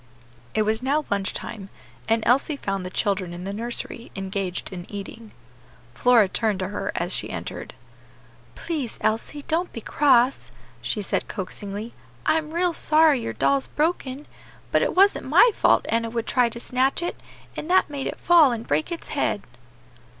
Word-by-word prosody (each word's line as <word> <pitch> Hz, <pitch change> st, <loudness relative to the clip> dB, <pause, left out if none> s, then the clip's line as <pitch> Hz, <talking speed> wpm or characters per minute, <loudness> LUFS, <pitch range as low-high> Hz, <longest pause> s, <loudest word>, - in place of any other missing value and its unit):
It 215 Hz, -, +3 dB
was 220 Hz, +2 st, 0 dB
now 285 Hz, +4 st, +1 dB
lunch 200 Hz, -1 st, 0 dB
time, 200 Hz, -3 st, -7 dB, 0.4 s
and 225 Hz, 0 st, +2 dB
Elsie 275 Hz, +5 st, +3 dB
found 195 Hz, -6 st, -3 dB
the 180 Hz, -, -5 dB
children 185 Hz, -2 st, -1 dB
in 175 Hz, -, -7 dB
the 195 Hz, +1 st, -4 dB
nursery 235 Hz, +1 st, -5 dB
engaged 195 Hz, -1 st, -3 dB
in 175 Hz, -1 st, -8 dB
eating. 210 Hz, +2 st, -8 dB, 0.6 s
Flora 235 Hz, -, +5 dB
turned 215 Hz, +1 st, 0 dB
to 185 Hz, -, -2 dB
her 205 Hz, -, -3 dB
as -, -, -1 dB
she -, -, -2 dB
entered. -, -, -6 dB, 0.8 s
"Please, 295 Hz, -9 st, -4 dB
Elsie, 230 Hz, +7 st, -1 dB
don't 340 Hz, +4 st, -1 dB
be -, -, -6 dB
cross," 260 Hz, +1 st, +3 dB, 0.3 s
she 210 Hz, -, -2 dB
said -, -, -1 dB
coaxingly: 205 Hz, +3 st, -6 dB, 0.3 s
"I 320 Hz, -, +4 dB
am 310 Hz, -1 st, -8 dB
real 345 Hz, +1 st, +1 dB
sorry 310 Hz, -4 st, +4 dB
your 115 Hz, -, -4 dB
doll's 135 Hz, +3 st, +1 dB
broken, 295 Hz, -3 st, -1 dB, 0.5 s
but -, -, +3 dB
it -, -, 0 dB
wasn't 395 Hz, +2 st, +4 dB
my 480 Hz, -, +6 dB
fault -, -, +3 dB
Enna 230 Hz, 0 st, 0 dB
would 230 Hz, 0 st, -3 dB
try 250 Hz, -2 st, +2 dB
to 235 Hz, -, -7 dB
snatch 260 Hz, +6 st, 0 dB
it, 345 Hz, -, -4 dB, 0.4 s
and 310 Hz, -, -6 dB
that 375 Hz, +1 st, +4 dB
made 285 Hz, -2 st, -4 dB
it -, -, -4 dB
fall 335 Hz, -6 st, +6 dB
and 235 Hz, -1 st, -4 dB
break 150 Hz, -, 0 dB
its 340 Hz, -, -6 dB
head." -, -, -1 dB
230 Hz, 170 wpm, -24 LUFS, 200-295 Hz, 0.8 s, my